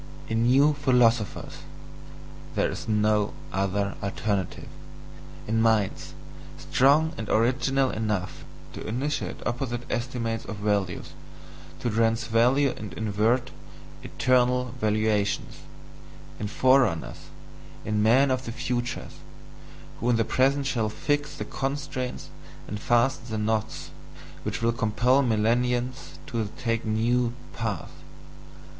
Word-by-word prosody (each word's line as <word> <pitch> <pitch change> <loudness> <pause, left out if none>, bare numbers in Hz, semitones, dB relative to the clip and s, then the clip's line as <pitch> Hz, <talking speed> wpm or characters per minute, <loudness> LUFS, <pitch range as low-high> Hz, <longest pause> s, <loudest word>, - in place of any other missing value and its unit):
In 115 +1 +1
NEW 140 +4 +5
PHILOSOPHERS 120 -5 +2 1.0
there - - +1
is - - -7
no 105 -1 +2 0.2
other 100 +1 0
alternative: 100 -1 -2 0.8
in 110 +1 +1
minds 110 -7 +1 0.4
strong 150 +5 +3
and 110 - -5
original 130 +3 +2
enough 105 -7 -2 0.3
to - - -7
initiate 135 +7 -3
opposite 120 0 -2
estimates 120 -2 -2
of 110 - -5
value, 100 -3 -1 0.8
to 120 - 0
transvalue 115 +4 +2
and 105 -4 -7
invert 110 +6 0 0.5
"eternal 125 -1 +1
valuations"; 105 -1 0 0.8
in 105 - -2
forerunners, 125 - +2 0.6
in 105 -1 0
men 130 +6 +5
of 130 0 -1
the 115 - -4
future, 125 0 -3 0.9
who 120 - 0
in 120 - +4
the 115 -1 +2
present 135 +4 +2
shall 120 -5 0
fix 145 +6 -1
the - - -5
constraints 135 -2 -4 0.4
and 105 - -5
fasten 120 +3 +1
the 110 - -2
knots 110 0 -2 0.5
which 110 +5 -4
will 115 0 +3
compel 120 +4 +2
millenniums 125 +2 0
to 115 -3 -3
take 115 -2 -1
NEW 115 +2 +1 0.2
paths. 110 -6 -3
115 Hz, 110 wpm, -26 LUFS, 110-125 Hz, 1.0 s, NEW